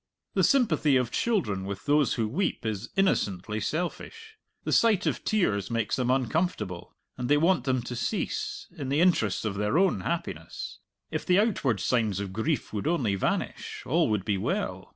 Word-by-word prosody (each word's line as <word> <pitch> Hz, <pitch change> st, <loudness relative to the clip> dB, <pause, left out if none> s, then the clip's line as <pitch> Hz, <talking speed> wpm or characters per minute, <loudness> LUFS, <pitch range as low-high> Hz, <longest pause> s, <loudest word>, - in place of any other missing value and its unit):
The -, -, +2 dB
sympathy 165 Hz, -, +3 dB
of 125 Hz, -2 st, +1 dB
children 160 Hz, -, 0 dB
with 100 Hz, 0 st, -6 dB
those 145 Hz, -1 st, +3 dB
who 115 Hz, -2 st, 0 dB
weep 165 Hz, -, -1 dB
is 110 Hz, +1 st, -3 dB
innocently 105 Hz, -, +1 dB
selfish. 440 Hz, -, -4 dB, 0.3 s
The -, -, -2 dB
sight 220 Hz, -4 st, +4 dB
of -, -, -1 dB
tears 105 Hz, -, +1 dB
makes 115 Hz, -3 st, 0 dB
them 125 Hz, -1 st, -1 dB
uncomfortable, 130 Hz, -, -1 dB, 0.2 s
and 125 Hz, 0 st, -3 dB
they 145 Hz, -, +5 dB
want 165 Hz, -4 st, +3 dB
them 130 Hz, -3 st, +1 dB
to 125 Hz, -, -5 dB
cease, 120 Hz, -, -2 dB
in 135 Hz, -2 st, -5 dB
the 140 Hz, +2 st, +2 dB
interests 160 Hz, -, +2 dB
of 105 Hz, -, -1 dB
their 105 Hz, +8 st, 0 dB
own 190 Hz, 0 st, +3 dB
happiness. 85 Hz, -, -4 dB, 0.3 s
If -, -, -2 dB
the 180 Hz, -, +3 dB
outward 160 Hz, -, +1 dB
signs 110 Hz, -1 st, +1 dB
of 100 Hz, -2 st, -4 dB
grief 135 Hz, +7 st, -1 dB
would 105 Hz, +5 st, -2 dB
only 135 Hz, -12 st, +1 dB
vanish, 95 Hz, -, -2 dB
all 165 Hz, 0 st, +2 dB
would 105 Hz, -3 st, 0 dB
be 100 Hz, -3 st, 0 dB
well. -, -, -2 dB
130 Hz, 175 wpm, -28 LUFS, 105-170 Hz, 0.3 s, they